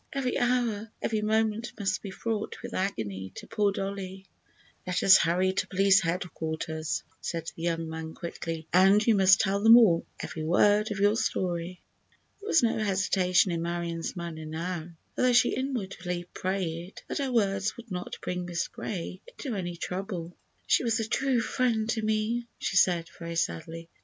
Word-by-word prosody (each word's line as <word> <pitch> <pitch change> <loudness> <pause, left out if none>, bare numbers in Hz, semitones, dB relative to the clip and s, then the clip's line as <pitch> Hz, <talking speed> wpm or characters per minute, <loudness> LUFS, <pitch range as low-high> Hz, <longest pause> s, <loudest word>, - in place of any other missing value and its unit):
Every 270 -2 -1
hour, 240 -3 0
every 220 -1 -1
moment 220 +2 0
must 195 -2 0
be 200 - -6
fraught 215 +2 -3
with - - -6
agony 100 - -3
to - - -8
poor 205 -2 +1
Dollie." 195 -1 -5 0.6
"Let 180 0 0
us 190 - +9
hurry 185 +2 +2
to - - -1
Police 195 0 +4
Headquarters," 160 -2 -3 0.2
said 165 -1 -4
the - - -9
young 165 -1 -1
man, 160 0 -6
quickly, 165 -1 -5
"and 195 +4 +6
you 230 - +5
must 190 -1 +6
tell 200 0 0
them 225 +2 +9
all—every 170 -6 +1
word 205 +6 +3
of 210 - -3
your 205 +2 +3
story." 180 -4 -2 0.6
There 410 - -10
was 325 - +4
no 225 -1 +2
hesitation 190 -2 +2
in 170 -1 -1
Marion's 170 0 -3
manner 165 -3 -6
now, 165 +1 -4 0.3
although 255 -1 +3
she 240 - +4
inwardly 190 -9 -3
prayed 180 -1 -3
that - - -3
her 275 -2 -1
words 200 -2 +1
would 235 -2 -12
not 180 -1 -5
bring 180 0 -3
Miss 175 -1 -2
Gray 185 -1 -5
into 265 - -6
any 175 -3 -3
trouble. 180 -1 -5 0.3
"She - - +3
was 230 -1 +1
a 220 - -2
true 265 +1 +1
friend 225 -2 0
to 225 - -1
me," 220 +2 0
she - - -3
said, 175 -3 +3
very 170 0 -5
sadly. 165 - -3
190 Hz, 165 wpm, -28 LUFS, 170-215 Hz, 0.6 s, us